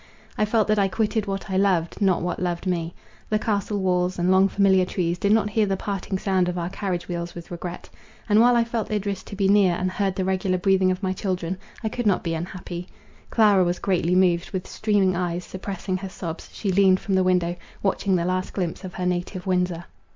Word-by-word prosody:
I 215 Hz, -, +2 dB
felt 215 Hz, 0 st, +2 dB
that 215 Hz, -1 st, +3 dB
I 195 Hz, -, +3 dB
quitted 215 Hz, +2 st, -1 dB
what 195 Hz, 0 st, -4 dB
I 190 Hz, -, +1 dB
loved, 185 Hz, -2 st, +1 dB
not 190 Hz, -4 st, +2 dB
what 175 Hz, 0 st, -2 dB
loved 175 Hz, 0 st, -2 dB
me. 170 Hz, -2 st, -2 dB, 0.3 s
The 215 Hz, -, +2 dB
castle 210 Hz, -1 st, -1 dB
walls, 180 Hz, -1 st, 0 dB
and 175 Hz, +1 st, +2 dB
long 190 Hz, +1 st, +5 dB
familiar 190 Hz, -2 st, +4 dB
trees, 175 Hz, -1 st, -1 dB
did 200 Hz, -, +1 dB
not 210 Hz, -1 st, +3 dB
hear 215 Hz, -1 st, +2 dB
the 195 Hz, 0 st, 0 dB
parting 195 Hz, -1 st, -3 dB
sound 185 Hz, -2 st, +1 dB
of 180 Hz, -, -3 dB
our 175 Hz, +1 st, -3 dB
carriage 185 Hz, -4 st, -3 dB
wheels 170 Hz, -1 st, -4 dB
with 170 Hz, 0 st, -9 dB
regret. 175 Hz, 0 st, -6 dB, 0.4 s
And, 210 Hz, 0 st, +5 dB
while 245 Hz, +1 st, +5 dB
I 235 Hz, -, +4 dB
felt 230 Hz, -1 st, -3 dB
Idris 200 Hz, -2 st, -2 dB
to -, -, -9 dB
be 195 Hz, -1 st, +1 dB
near, 195 Hz, -3 st, +4 dB
and 185 Hz, +1 st, -1 dB
heard 195 Hz, -1 st, -1 dB
the 190 Hz, -, -1 dB
regular 190 Hz, 0 st, 0 dB
breathing 190 Hz, 0 st, +3 dB
of 185 Hz, +2 st, -2 dB
my 185 Hz, 0 st, 0 dB
children, 185 Hz, -2 st, -2 dB, 0.3 s
I 220 Hz, -, 0 dB
could 240 Hz, 0 st, -2 dB
not 195 Hz, -, +2 dB
be 165 Hz, -2 st, -1 dB
unhappy. 175 Hz, +1 st, -5 dB, 0.4 s
Clara 205 Hz, -4 st, +5 dB
was 175 Hz, 0 st, 0 dB
greatly 180 Hz, -2 st, +1 dB
moved; 175 Hz, -2 st, +3 dB
with 185 Hz, -1 st, -4 dB
streaming 205 Hz, -4 st, +1 dB
eyes, 175 Hz, 0 st, -2 dB
suppressing 190 Hz, 0 st, -4 dB
her 190 Hz, +1 st, -6 dB
sobs, 170 Hz, -3 st, -7 dB
she 200 Hz, -, -2 dB
leaned 190 Hz, 0 st, +4 dB
from 195 Hz, -, -3 dB
the 190 Hz, -, +4 dB
window, 180 Hz, -1 st, +1 dB, 0.3 s
watching 195 Hz, -1 st, +1 dB
the 170 Hz, -1 st, 0 dB
last 185 Hz, +1 st, -1 dB
glimpse 180 Hz, -4 st, -3 dB
of 185 Hz, -2 st, -7 dB
her 180 Hz, -, -3 dB
native 180 Hz, +1 st, -2 dB
Windsor. 180 Hz, -2 st, 0 dB
185 Hz, 225 wpm, -24 LUFS, 180-200 Hz, 0.4 s, long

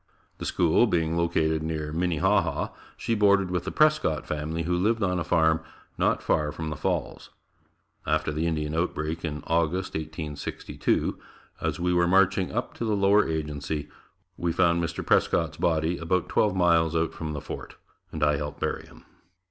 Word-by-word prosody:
The -, -, -4 dB
school 85 Hz, +7 st, +3 dB
being 80 Hz, -4 st, 0 dB
located 80 Hz, -2 st, +1 dB
near 80 Hz, -1 st, -3 dB
Minnehaha, 90 Hz, -1 st, +1 dB, 0.3 s
she 115 Hz, -, -1 dB
boarded 100 Hz, -3 st, +3 dB
with 90 Hz, -1 st, -1 dB
the 95 Hz, -, -3 dB
Prescott 150 Hz, -, +2 dB
family 80 Hz, +2 st, -3 dB
who 90 Hz, +2 st, 0 dB
lived 110 Hz, +5 st, +1 dB
on 90 Hz, -1 st, +1 dB
a -, -, -1 dB
farm 80 Hz, 0 st, +3 dB, 0.3 s
not -, -, +1 dB
far 75 Hz, -1 st, +1 dB
from 80 Hz, 0 st, -5 dB
the -, -, -3 dB
Falls. -, -, -3 dB, 0.8 s
After 75 Hz, 0 st, +1 dB
the 80 Hz, +2 st, -1 dB
Indian 75 Hz, -2 st, -1 dB
outbreak 80 Hz, -1 st, -2 dB
in 75 Hz, -2 st, -4 dB
August 85 Hz, +3 st, 0 dB
1862, 80 Hz, -2 st, -3 dB, 0.4 s
as -, -, -2 dB
we 90 Hz, +1 st, +1 dB
were 85 Hz, 0 st, +3 dB
marching 95 Hz, 0 st, +3 dB
up 120 Hz, +3 st, -3 dB
to -, -, -5 dB
the 110 Hz, -2 st, +1 dB
Lower 100 Hz, 0 st, +4 dB
Agency, 75 Hz, -1 st, -3 dB, 0.5 s
we 85 Hz, -1 st, 0 dB
found 85 Hz, 0 st, +2 dB
Mr. 85 Hz, -, -4 dB
Prescott's -, -, +2 dB
body 80 Hz, 0 st, +1 dB
about 85 Hz, +2 st, 0 dB
twelve 105 Hz, -3 st, +2 dB
miles 85 Hz, -3 st, +3 dB
out 80 Hz, 0 st, 0 dB
from 80 Hz, -2 st, -5 dB
the 75 Hz, -, -3 dB
fort, -, -, -8 dB, 0.4 s
and -, -, -3 dB
I 75 Hz, -1 st, +3 dB
helped 75 Hz, 0 st, -5 dB
bury -, -, -3 dB
him. -, -, -17 dB
85 Hz, 170 wpm, -26 LUFS, 80-90 Hz, 0.8 s, Lower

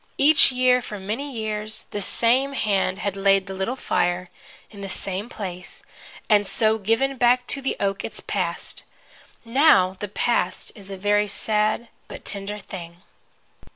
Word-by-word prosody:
Each 300 Hz, 0 st, +6 dB
year, 250 Hz, 0 st, +3 dB
for 210 Hz, -3 st, -7 dB
many 225 Hz, +9 st, -4 dB
years, 220 Hz, -2 st, -4 dB
the 205 Hz, -, -3 dB
same 250 Hz, +7 st, +2 dB
hand 195 Hz, -6 st, +1 dB
had 200 Hz, -1 st, -2 dB
laid 195 Hz, -1 st, +3 dB
the 195 Hz, -, -6 dB
little 190 Hz, +7 st, -2 dB
fire, 175 Hz, -7 st, -1 dB, 0.4 s
in 200 Hz, -2 st, -11 dB
the 195 Hz, -, -5 dB
same 195 Hz, +3 st, -3 dB
place, 180 Hz, -6 st, -6 dB, 0.4 s
and 205 Hz, -2 st, +4 dB
so 220 Hz, +1 st, +3 dB
given 235 Hz, +7 st, +1 dB
back 245 Hz, +1 st, +4 dB
to 275 Hz, -, +1 dB
the 270 Hz, -, -1 dB
oak 195 Hz, 0 st, -1 dB
its -, -, -4 dB
Past. -, -, -3 dB, 0.6 s
Now, 230 Hz, -7 st, +5 dB
the 205 Hz, -, -3 dB
Past 195 Hz, -2 st, 0 dB
is 200 Hz, -2 st, -11 dB
a 195 Hz, -, -6 dB
very 205 Hz, +2 st, +2 dB
sad 215 Hz, +2 st, 0 dB, 0.2 s
but -, -, -10 dB
tender 200 Hz, +1 st, -4 dB
thing. 175 Hz, -3 st, -9 dB
210 Hz, 155 wpm, -24 LUFS, 195-240 Hz, 0.6 s, Each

